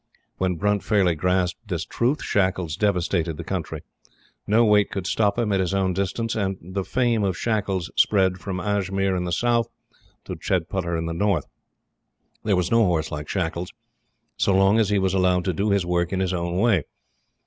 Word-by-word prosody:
When 95 -1 0
Brunt 105 +3 0
fairly 95 -5 +2
grasped 90 +5 -1
this 90 -3 -3
truth, 130 +6 -1
Shackles 95 -5 0
devastated 90 -4 0
the 85 - -6
country. 90 -2 -4 0.7
No 115 +3 +4
weight 105 -2 +4
could 95 -3 -4
stop 100 +1 +1
him 115 -3 0
at 95 - +2
his 95 +1 0
own 95 -1 +1
distance; 100 +5 -2
and 95 -3 -1
the 95 +3 -4
fame 120 -1 +1
of 95 -3 0
Shackles 100 -6 -1
spread 95 -3 +3
from 95 0 -4
Ajmir 95 0 0
in 90 -1 -2
the 90 - -3
South, 120 +4 +1 0.6
to - - -5
Chedputter 85 0 -1
in 80 - -3
the 85 - -3
North. 90 -3 0 1.0
There 105 -2 +2
was 90 -1 0
no 115 0 +5
horse 80 -4 0
like 75 -1 -5
Shackles, 90 -1 -2 0.6
so 100 - +2
long 95 +3 +4
as 110 -3 +2
he 105 - +2
was 95 -1 +1
allowed 90 -1 +2
to 95 - 0
do 100 +6 0
his 100 -3 +2
work 85 -1 0
in 95 - -1
his 95 -1 0
own 85 0 -2
way. 100 - +2
95 Hz, 190 wpm, -24 LUFS, 90-105 Hz, 1.0 s, no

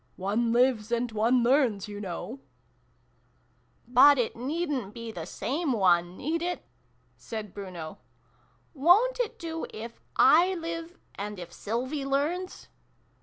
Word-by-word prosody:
One 215 +5 0
lives 240 -2 +2
and 235 0 0
one 230 +3 +2
learns, 240 -6 +2
you 205 0 -7
know! 205 +7 -6 0.5
" - - -39
" - - -39 0.3
But 265 +4 +7
it 240 -3 0
needn't 270 - -3
be 230 -1 -6
the 170 -5 -7
same 285 - -2
one, 180 -4 +2
need 325 +4 -2
it? 355 +1 -3 0.3
" - - -39
said 215 -4 -7
Bruno. 180 -6 -7 0.4
" - - -37
Wo' 350 - +5
n't - - -11
it 485 -3 -1
do, 325 -1 -5
if 230 +2 -9
/ - - -19
live, 335 0 +3 0.2
and 205 +1 -5
if 175 -1 -9
Sylvie 255 +7 -3
learns 300 +7 -2
245 Hz, 150 wpm, -28 LUFS, 210-315 Hz, 0.5 s, But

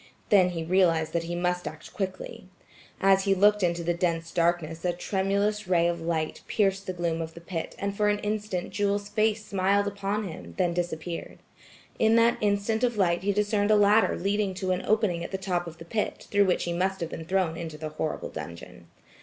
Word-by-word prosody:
Then 190 -3 +5
he 165 -2 -4
realized 165 -2 +2
that 170 -1 0
he 175 +1 -3
must 180 -1 -1
act 155 +1 -9
quickly. 185 -1 -5 0.5
As 195 0 +4
he 195 -1 +3
looked 205 +2 +4
into 170 -1 0
the 175 +1 +1
dense 170 -1 -1
darkness 170 -2 0
a 175 -1 +1
tremulous 200 +3 -1
ray 170 -2 +3
of 170 -1 -2
light 160 -1 -2
pierced 195 -2 +1
the 185 - -2
gloom 170 -2 -1
of 160 0 -6
the - - -8
pit 170 -1 -5
and 200 0 -3
for 210 0 +2
an 205 - +2
instant 210 -3 -3
Jewel's 205 0 -1
face 215 0 +1
smiled 200 +1 +2
upon 200 +1 -2
him, 85 - -9
then 175 -1 +1
disappeared. 170 -1 -4 0.6
In 220 0 +4
that 230 +1 +4
instant 210 +2 +1
of 240 -3 +1
light 175 -3 +2
he 200 +2 +1
discerned 205 0 +1
a 215 - +6
ladder 205 -1 +4
leading 200 0 0
to 185 -1 -2
an 185 0 -1
opening 205 -6 +1
at - - -5
the 190 - -3
top 180 -2 -2
of 165 -1 -9
the 165 - -11
pit, 210 +5 -3
through 205 0 +4
which 185 - +1
he 175 - -2
must 190 +2 0
have 165 - -2
been 160 - -6
thrown 185 -2 0
into 165 -2 -6
the 155 0 -5
horrible 155 0 -3
dungeon. 85 -7 -9
185 Hz, 210 wpm, -27 LUFS, 170-205 Hz, 0.6 s, a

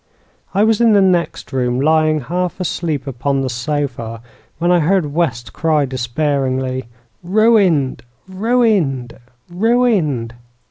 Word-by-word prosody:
I 200 - +4
was 220 +1 +2
in 230 -2 +5
the 205 - +5
next 180 -6 0
room, 125 -1 0
lying 155 +1 +2
half 175 +8 -3
asleep 165 -6 -2
upon 135 +1 -2
the 130 -2 -2
sofa, 120 -3 -4 0.3
when 175 +1 +1
I 175 - +4
heard 165 -2 +1
West 130 -8 -2
cry 155 -3 +1
despairingly: 130 0 -2 0.4
'Ruined 190 - +2 0.3
ruined 190 - 0 0.3
ruined!' 180 - +1
155 Hz, 120 wpm, -17 LUFS, 130-185 Hz, 0.4 s, in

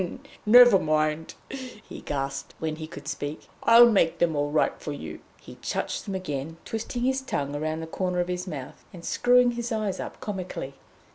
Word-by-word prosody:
"Never 245 -2 +9
mind," 155 0 0
he 255 -5 -9
gasped, 135 -1 -4
when 155 -1 -3
he 160 -1 -6
could 150 -3 -10
speak, 145 0 -5
"I'll 235 +1 +8
make 195 -7 +3
them 165 -2 +2
all 145 0 0
right 150 +1 +2
for 150 - -4
you." 145 - -7 0.2
He - - -13
touched - - -3
them 195 -3 -4
again, 160 -3 -4
twisting 225 +2 -3
his 265 +1 +1
tongue 145 - -3
round 155 +2 -2
the - - -4
corner 180 +2 -2
of 175 - +1
his 180 +1 -3
mouth, 140 -5 -7
and 170 -2 -10
screwing 245 0 +4
his 235 0 -4
eyes 215 -3 -1
up - - -6
comically. 185 -9 -5
175 Hz, 185 wpm, -26 LUFS, 155-225 Hz, 0.2 s, Never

